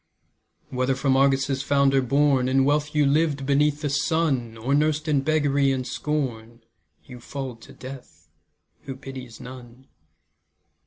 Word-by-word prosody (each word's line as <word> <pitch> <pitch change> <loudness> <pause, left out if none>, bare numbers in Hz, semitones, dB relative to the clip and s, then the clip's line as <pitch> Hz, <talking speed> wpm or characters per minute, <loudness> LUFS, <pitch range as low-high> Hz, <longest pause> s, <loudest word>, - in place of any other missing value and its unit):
Whether 130 +1 0
from 135 0 +1
Argos' 135 0 +2
founder 140 -1 +3
born 135 0 +2
In 135 0 +3
wealth 150 +1 0
you 150 -1 +4
lived 145 -1 +1
beneath 145 +1 +2
the 150 - -1
sun, 140 -6 0
Or 125 +5 -1
nursed 155 +1 +1
in 145 -3 +2
beggary 145 -2 +2
and 130 -1 -2
scorn, 120 -5 -4 0.4
You 125 -2 -11
fall 130 0 -6
to 115 - -15
Death, 130 0 -11 0.6
who 135 - -6
pities 130 -3 -9
none. 125 0 -12
135 Hz, 140 wpm, -24 LUFS, 130-145 Hz, 0.6 s, you